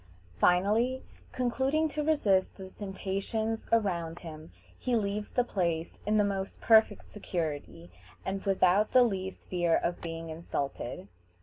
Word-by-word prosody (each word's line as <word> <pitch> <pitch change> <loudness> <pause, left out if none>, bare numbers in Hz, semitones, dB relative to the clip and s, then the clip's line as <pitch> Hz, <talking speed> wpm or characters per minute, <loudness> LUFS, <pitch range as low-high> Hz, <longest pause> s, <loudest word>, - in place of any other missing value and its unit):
Finally, 215 +8 +3 0.3
concluding 265 +5 +1
to 300 0 -3
resist 210 -12 +2
the 190 -1 -9
temptations 205 +3 -3
around 175 -7 0
him, 160 -1 -9 0.2
he 250 -2 -1
leaves 210 -1 -1
the 245 - +1
place 170 -7 -2
in 215 +1 +3
the 210 - +5
most 195 -1 -3
perfect 220 -2 +4
security, 155 - -4 0.3
and 195 0 -2
without 195 +1 +3
the 255 - +8
least 190 -4 -3
fear 175 -2 +2
of 175 - -1
being 165 -1 -5
insulted. 140 - -4
195 Hz, 130 wpm, -30 LUFS, 170-225 Hz, 0.3 s, the